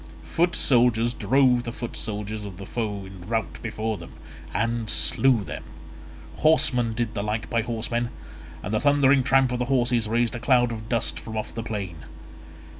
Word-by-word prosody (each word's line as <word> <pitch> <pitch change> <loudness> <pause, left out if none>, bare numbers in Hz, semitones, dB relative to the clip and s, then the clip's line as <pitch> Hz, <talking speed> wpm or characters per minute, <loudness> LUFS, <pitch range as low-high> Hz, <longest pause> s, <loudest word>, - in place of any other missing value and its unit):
Foot 175 +1 +2
soldiers 120 -2 +3
drove 130 -2 +3
the 120 - -5
foot 120 0 -6
soldiers 105 0 -4
of 100 -3 -8
the 100 - -8
foe 105 -4 -3
in 95 -1 -11
rout 115 -1 -2
before 110 -2 -3
them, 85 - -11 0.4
and 115 -1 -1
slew 130 -5 +2
them; - - -6 0.7
horsemen 125 -7 +3
did 115 -1 -1
the 100 - -2
like 105 +1 -3
by 115 - +2
horsemen, 120 +1 -2 0.5
and 100 - -4
the 110 - +1
thundering 140 -2 +5
tramp 135 0 +3
of 125 - -1
the 125 - 0
horses 120 -3 +1
raised 115 +1 +1
a 120 - -4
cloud 125 -1 +3
of 110 -1 -7
dust 115 -2 0
from 110 -1 -6
off 110 - -4
the 115 - -4
plain. 100 -7 -4
115 Hz, 180 wpm, -25 LUFS, 110-125 Hz, 0.7 s, thundering